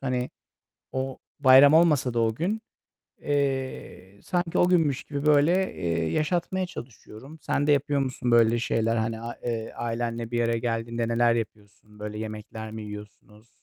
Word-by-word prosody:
Hani, 125 -2 -2 0.6
o, 130 0 -3 0.2
bayram 135 +1 +8
olmasa 150 -7 +4
da 120 - 0
o 110 -1 +1
gün, 200 - -2 0.6
eee, 135 -8 -3
sanki 175 -2 -1
o 175 - +4
günmüş 160 -7 +2
gibi 145 0 -5
böyle, 155 +6 +3
eee, 85 -2 -1
yaşatmaya 175 +4 0
çalışıyorum. 130 -1 -11
Sen 145 - 0
de - - +5
yapıyor 145 0 +2
musun 130 -2 -2
böyle 115 0 +4
şeyler? 115 -1 0
Hani 110 0 -2
a 120 +1 -6
eee, 115 -2 -3
ailenle 115 0 -3
bir 120 0 +1
araya 115 0 +1
geldiğinde 115 0 -2
neler 115 0 +3
yapıyorsun? 105 -1 -7
Böyle 105 0 -6
yemekler 110 0 -7
mi 110 0 -7
yiyorsunuz? 105 +1 -11
120 Hz, 155 wpm, -26 LUFS, 110-145 Hz, 0.6 s, bayram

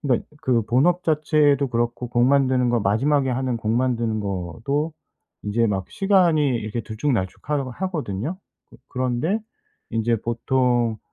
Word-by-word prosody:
그니까 130 -5 0 0.2
그 120 -5 +2
본업 170 +10 +2
자체도 150 -3 +2
그렇고 120 +1 -2
곡 120 0 +2
만드는 130 -2 +3
거 120 -2 +2
마지막에 130 +7 +2
하는 125 -1 -1
곡 110 -1 -3
만드는 115 -3 0
것도 105 - -2 0.5
이제 115 +3 +1
막 95 -3 -2
시간이 185 -5 +3 0.2
이렇게 110 +1 -4
들쭉날쭉하 110 +3 -2 0.2
하거든요. 160 - -3 0.3
그 - - -16 0.2
그런데 130 - 0 0.5
인제 115 +1 +1
보통 120 -1 +1
125 Hz, 295 characters per minute, -23 LUFS, 115-145 Hz, 0.5 s, 만드는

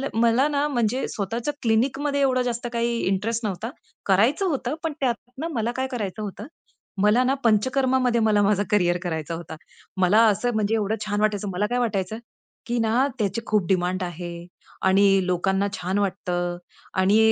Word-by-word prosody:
मला 235 +5 +3
ना 290 0 0
म्हणजे 245 -2 0
स्वतःच्या 230 +7 -3
क्लिनिकमध्ये 270 +5 +1
एवढं 255 -2 +3
जास्त 240 -1 -2
काही 235 0 0
इंटरेस्ट 220 +4 -1
नव्हता. 210 +3 -3 0.4
करायचं 230 - +3
होतं, 275 -2 -2
पण 320 -2 -1
त्यातनं 255 +3 -3
मला 230 0 -1
काय 260 0 -1
करायचं 215 -4 -4
होतं? 210 +3 -6 0.5
मला 210 +5 +4
ना 260 +1 +2
पंचकर्मामध्ये 255 +2 +2
मला 210 -2 +3
माझं 205 0 +2
करियर 175 -4 +3
करायचं 160 -2 -3
होता. 165 -1 -8 0.5
मला 200 +5 +5
असं 215 +4 +1
म्हणजे 215 +1 +1
एवढं 215 0 0
छान 205 0 -1
वाटायचं, 205 -1 0
मला 190 +4 0
काय 245 - 0
वाटायचं, 215 -3 -1 0.5
की 240 +1 -1
ना 230 +5 +2
त्याची 205 +1 -1
खूप 210 -4 +1
डिमांड 185 0 0
आहे 175 0 -6 0.4
आणि 195 0 +4
लोकांना 190 +2 +1
छान 185 +1 -2
वाटतं 180 -3 -2 0.4
आणि 195 +3 +4
215 Hz, 160 wpm, -24 LUFS, 190-245 Hz, 0.5 s, मला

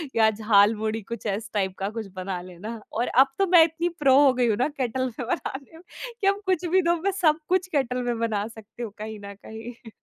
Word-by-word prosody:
या 220 -1 +5
झालमुड़ी 215 +1 +2
कुछ 230 +3 -8
इस 220 +2 -5
टाइप 190 -2 -1
का 195 +1 -1
कुछ 220 -2 -6
बना 185 -1 -4
लेना, 190 +6 -8
और 235 +3 0
अब 265 +2 +5
तो 390 - +3
मैं 345 -2 +8
इतनी 335 +2 -1
प्रो 270 -2 +5
हो 265 - +5
गई 245 -1 +1
हूँ 215 -3 +1
ना 255 - +2
केटल 260 -3 -2
में 250 - -4
बनाने 275 +4 -4
में 340 - -16 0.4
कि 390 - +2
अब 400 +1 +2
कुछ 370 -2 0
भी 370 +2 +3
दो 340 0 +2
मैं 395 +1 +1
सब 310 -1 +4
कुछ 370 0 +2
केटल 255 -6 -1
में 240 -1 -1
बना 215 -3 -1
सकती 225 +1 -10
हूँ 215 - -5
कहीं 215 0 -7
न 200 - -7
कहीं। 225 +1 -9
235 Hz, 235 wpm, -25 LUFS, 215-305 Hz, 0.4 s, मैं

